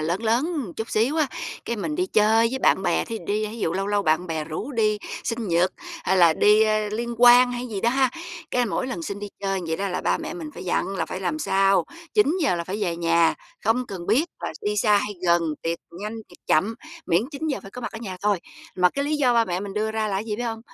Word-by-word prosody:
lớn 170 +7 -1
lớn 230 +4 +2
một 290 - -3
chút 220 +1 -4
xíu 235 +8 +1
á, 310 -2 +3 0.4
cái 235 - -2
mình 165 -7 -3
đi 180 - 0
chơi 220 +3 +4
với 265 - -2
bạn 190 - +3
bè, - - +1
thí 230 - -5
dụ - - -13
đi 210 +1 0
thí 215 +2 -7
dụ 165 - 0
lâu 195 +2 -1
lâu 205 0 +1
bạn 160 +1 +1
bè 160 -2 -3
rủ 165 - -5
đi 215 -3 +1 0.3
sinh 230 -2 -2
nhật 175 +2 +2 0.3
hay 190 - +2
là 170 -3 +6
đi, 210 +6 +5
ơ, 215 -1 +1
liên 235 +3 -3
hoan 245 +1 +7
hay 245 0 -3
cái - - -5
gì 200 -3 -3
đó 235 - +2
ha, 265 -1 +2 0.4
cái 245 -1 +1
mỗi 245 +4 -2
lần 295 +6 -4
xin 200 -10 -4
đi 205 0 -6
chơi 195 -1 -1
vậy 160 0 -1
đó 200 0 -2
là 180 - -2
ba - - +1
mẹ - - -5
mình 325 -3 -6
phải - - -8
dặn 190 +2 -1
là - - -1
phải 185 - -5
làm 250 +11 -1
sao 195 -7 +3 0.3
9:00 350 - +3
là 170 - -3
phải 190 +4 -4
về 170 -3 -1
nhà, 170 0 +3 0.3
không 240 +4 +2
cần 180 -3 -7
biết 275 +8 +3 0.2
là - - -4
đi 210 0 -1
xa 210 0 +4
hay 205 +1 -3
gần, 170 0 +4 0.2
tiệc 165 0 -1 0.2
nhanh 210 +2 -4
tiệc - - -17
chậm, 200 +9 +2 0.3
miễn 175 +4 +3
9:00 290 0 -2
giờ - - -8
phải 195 - -11
có 250 - -8
mặt 245 - -5
ở 225 - -6
nhà 195 -5 -6
thôi. 205 -2 +2 0.4
Mà 180 -1 +4
cái 280 +7 -2
lý 300 +1 0
do 255 -4 +3
ba 230 -1 +4
mẹ 180 -3 -2
mình 200 -1 -6
đưa 215 +1 0
ra 220 -1 -1
là 200 - -2
cái 200 - -2
gì 215 -2 -3
biết 240 - -3
hông? 225 -2 -3
210 Hz, 275 wpm, -24 LUFS, 185-240 Hz, 0.4 s, hoan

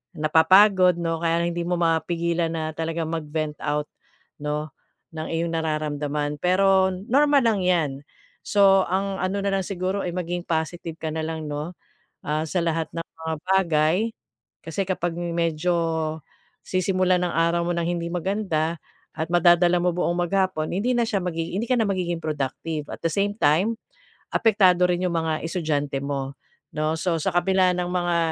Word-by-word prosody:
napapagod 180 +4 +5
'no, 165 -1 -1
kaya 165 0 +1
hindi 170 0 -2
mo 180 - -1
mapigilan 170 0 0
na 160 -1 -2
talagang 165 0 -3
mag-vent 155 -1 -3
out, 150 0 -1 0.5
'no 150 +1 -2 0.4
ng 155 0 -5
iyong 165 0 -1
nararamdaman. 150 -2 -2
Pero 190 +1 +3
normal 275 +9 +3
lang 200 -4 0
'yan. 170 -6 +2 0.5
So, 195 -2 +5
ang 195 +1 -1
ano 190 +2 -1
na 200 - 0
lang 190 - -3
siguro 190 +1 -2
ay 175 - -3
maging 175 0 -3
positive 165 +1 -2
ka 160 - -2
na 160 0 -2
lang 160 -2 -4
'no 150 +4 -4 0.5
sa 155 +3 -1
lahat 165 -1 -1
ng 165 0 -3
mga 160 0 -6 0.2
bagay 160 -2 +2 0.7
kasi 165 +4 -3
kapag 175 -2 -1
medyo 170 0 0 0.9
sisimulan 185 -1 +1
ang 175 - -2
araw 170 +1 +2
mo 175 - 0
ng 170 -1 -1
hindi 170 -1 -2
maganda 175 -3 -1 0.4
at 160 - -2
madadala 175 +1 +5
mo 180 0 +2
buong 175 -1 0
maghapon 185 -4 0
hindi 220 +7 0
na 240 - +2
siya 205 -5 0
magigi 165 -1 -3
hindi 225 - -1
ka 250 - +4
na 220 - +2
magiging 180 -3 -1
productive. 150 +1 -3
At - - -7
the 165 - +2
same 200 0 +1
time, 180 +10 +2 0.6
apektado 190 -5 +4
rin 180 0 0
yung 170 - -2
mga 160 -1 0
estudyante 150 -5 -1
mo 140 -1 -3 0.4
'no. 155 +1 0
So, 180 -3 0
sa 195 - 0
kabila 185 +1 +3
ng 180 0 -1
mga 175 -1 0
170 Hz, 160 wpm, -24 LUFS, 160-185 Hz, 0.9 s, napapagod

